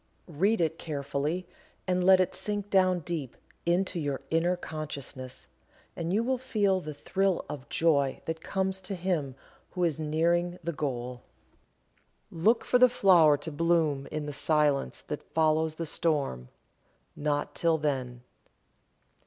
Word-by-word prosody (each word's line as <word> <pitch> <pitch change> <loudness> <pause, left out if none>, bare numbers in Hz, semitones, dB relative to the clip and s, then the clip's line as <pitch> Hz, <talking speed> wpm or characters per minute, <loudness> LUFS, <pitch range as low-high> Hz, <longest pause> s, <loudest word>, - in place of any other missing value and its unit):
Read 185 +7 +1
it 160 -1 0
carefully 150 +3 -3 0.4
and 180 -1 +1
let 190 0 +7
it 185 - +1
sink 205 +1 -3
down 185 -2 +3
deep 155 -6 -5 0.3
into 175 +1 +1
your 145 -3 -2
inner 170 +3 +2
consciousness, 140 -6 -7 0.5
and 165 0 -3
you 215 +4 +2
will 255 +1 0
feel 205 -7 +1
the 155 - -6
thrill 190 +5 0
of 140 -2 -8
joy 140 -5 +2
that 160 0 -4
comes 190 +1 -2
to 190 +1 -5
him 170 -7 -2 0.4
who 180 - -1
is 160 -3 +1
nearing 170 +3 +1
the 170 +1 -2
goal. 125 -4 -4 1.1
"Look 215 +8 +2
for 250 - +3
the 250 0 +7
flower 175 -10 +5
to 160 +3 -6
bloom 155 -3 +1
in 155 -1 -3
the 145 - -5
silence 150 -2 +1
that 150 - -5
follows 160 0 +2
the 165 - -4
storm; 145 - -1 0.7
not 145 -1 -1
till 165 -1 +2
then. 130 -5 -2
165 Hz, 145 wpm, -29 LUFS, 145-185 Hz, 1.1 s, let